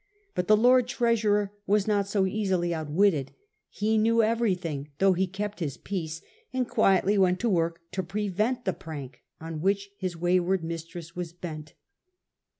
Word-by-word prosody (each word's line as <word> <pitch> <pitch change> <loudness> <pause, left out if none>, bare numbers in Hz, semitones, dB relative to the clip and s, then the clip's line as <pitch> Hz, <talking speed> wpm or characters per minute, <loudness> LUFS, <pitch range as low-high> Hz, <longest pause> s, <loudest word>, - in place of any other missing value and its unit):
But 180 - -2
the 215 - +6
Lord 250 +2 +5
Treasurer 215 -4 +1 0.2
was 205 0 +3
not 205 -2 +1
so 200 -1 +1
easily 190 -4 0
outwitted. 155 -1 +1 0.4
He 220 +1 +1
knew 230 +1 +4
every 225 -2 +2
thing, 150 -5 -5
though 195 +2 +4
he 185 +1 0
held 210 0 -3
his 150 -6 -3
peace, 160 -5 -5 0.3
and 255 -2 -1
quietly 195 0 +3
went 185 -1 +3
to 240 - +1
work 170 -3 0
to 190 - -1
prevent 210 +6 -1
the 190 - +1
prank 140 -7 -8 0.2
on 160 -1 -6
which 200 +2 0
his 185 -3 -3
wayward 180 +1 +1
mistress 165 0 -7
was 175 -2 -5
bent. 155 -4 -8
190 Hz, 160 wpm, -27 LUFS, 165-210 Hz, 0.4 s, the